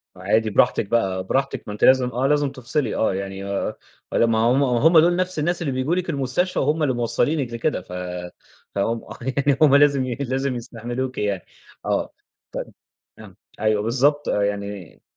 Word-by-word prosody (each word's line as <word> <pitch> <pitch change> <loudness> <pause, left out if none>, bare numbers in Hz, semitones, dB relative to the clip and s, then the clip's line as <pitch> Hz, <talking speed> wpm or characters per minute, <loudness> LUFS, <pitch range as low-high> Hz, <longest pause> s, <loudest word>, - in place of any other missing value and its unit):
وعادي 110 +4 +1
براحتِك 105 - +2
بقى، 95 -5 0
براحتِك، 135 +7 -1
ما 105 - -4
أنتِ 105 - -6
لازم 130 -1 +5
آه، 125 +3 0
لازم 145 -1 +2
تفصِلي، 135 +2 -2
آه 110 - +1
يعني 95 0 -5
آآ 100 0 -2 0.4
ما - - 0
لمّا 115 -1 +3
هُم 120 +5 +3
وهُم 140 +6 +5
دول 175 +2 +4
نفْس 185 -2 -1
الناس 175 +3 0
اللي 140 -6 -1
بييجوا 130 +7 0
لِك 180 -1 -2
المستشفى، 140 +5 0
وهُم 150 +3 +1
اللي 135 -3 +2
موصّلينِك 120 +2 0
لكده 115 -2 -1
ف 90 - -15 0.8
فهُم 115 +3 0 0.4
يعني 140 -1 +2
هُم 145 -3 +6
لازم 140 -2 +4
ي 125 -2 -3
لازم 135 -1 -2
يستحملوكِ 120 +2 -5
يعني، 100 -3 -2 0.4
آه، - - -1 0.4
طَب - - -6 0.5
آه، - - -13 0.2
أيوه 110 -1 +2
بالضبط، 140 +6 +1
آآ 100 - +1
يعني 100 -3 -4
130 Hz, 175 wpm, -22 LUFS, 110-145 Hz, 0.8 s, هُم